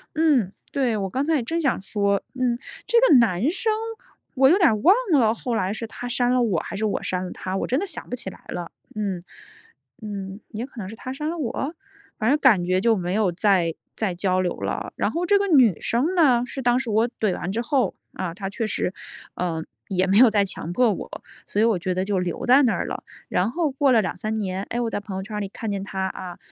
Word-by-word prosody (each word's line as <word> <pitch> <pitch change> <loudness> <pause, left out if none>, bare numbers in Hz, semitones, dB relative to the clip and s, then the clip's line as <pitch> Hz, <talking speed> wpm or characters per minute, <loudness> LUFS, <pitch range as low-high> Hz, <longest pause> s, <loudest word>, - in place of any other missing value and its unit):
嗯， 290 - +3 0.2
对， 255 -5 +1
我 195 -1 -2
刚 265 +7 -1
才 320 +1 +2
也 260 - 0
正 330 +8 -2
想 275 -6 +1
说， 200 0 0 0.2
嗯， 245 -2 +1 0.3
这 470 - +3
个 - - +6
男 230 - +3
生 440 +4 0 0.6
我 265 +1 +6
有 355 - +5
点 355 -5 +5
儿 220 - +2
忘 345 - +6 0.2
了， 230 -6 +4
后 235 0 -3
来 190 -2 0
是 230 - -5
他 245 +2 -7
删 245 0 +1
了 250 0 +3
我， 200 -9 +1
还 - - -7
是 220 - 0
我 210 - -1
删 185 0 -1
了 180 - -6
他， 185 0 -5
我 - - -2
真 255 - +1
的 400 - -2
想 350 - -6
不 250 - -2
起 215 - -5
来 - - -14
了， 175 -1 -5 0.2
嗯。 195 -5 -2 0.8
嗯， 200 -1 -6
也 225 +1 -4
可 275 - -19
能 190 -3 -5
是 220 - -8
他 255 +3 -6
删 300 +3 -3
了 340 - -3
我？ 285 +2 -3 0.5
反 220 0 +2
正 290 - +4
感 225 -11 +5
觉 185 +1 +1
就 230 +1 +4
没 180 0 -2
有 205 -3 +2
再 175 -2 +2 0.2
再 210 -5 -1
交 185 +1 +1
流 180 -1 0
了。 - - -3
然 - - +1
后 345 +2 -2
这 405 +2 +4
个 400 - 0
女 250 - +5
生 265 +10 +1
呢， 260 -9 +4
是 270 +1 -6
当 245 0 +3
时 260 - -4
我 225 +3 +2
怼 210 -4 +1
完 180 - -4
之 225 +4 -1
后， 265 +1 0 0.2
啊， 180 -3 -4
她 195 +1 -5
确 220 +2 -3
实， 190 -3 -1 0.4
呃， 165 -3 -2 0.2
也 185 -1 +1
没 195 +1 +3
有 250 -1 +8
再 205 -2 +3
强 175 -2 -5
迫 245 -2 +3
我， - - -8 0.2
所 205 - 0
以 - - +5
我 225 -6 +2
觉 185 +1 -1
得 185 - 0
就 195 -1 0
留 180 -2 -3
在 260 +3 +6
那 245 - +3
儿 - - -2
了。 - - -5 0.3
然 185 +5 +1
后 310 +1 0
过 275 0 +2
了 225 - +5
2-3 215 +2 -3
年， 190 -2 -2
哎， 240 - -2
我 235 - 0
在 205 - -2
朋 200 -1 -7
友 190 - -4
圈 210 0 -5
里 200 - -2
看 220 0 -5
见 200 - -2
她， 190 -1 -2
啊， 185 -1 -7
220 Hz, 265 characters per minute, -24 LUFS, 190-260 Hz, 0.8 s, 有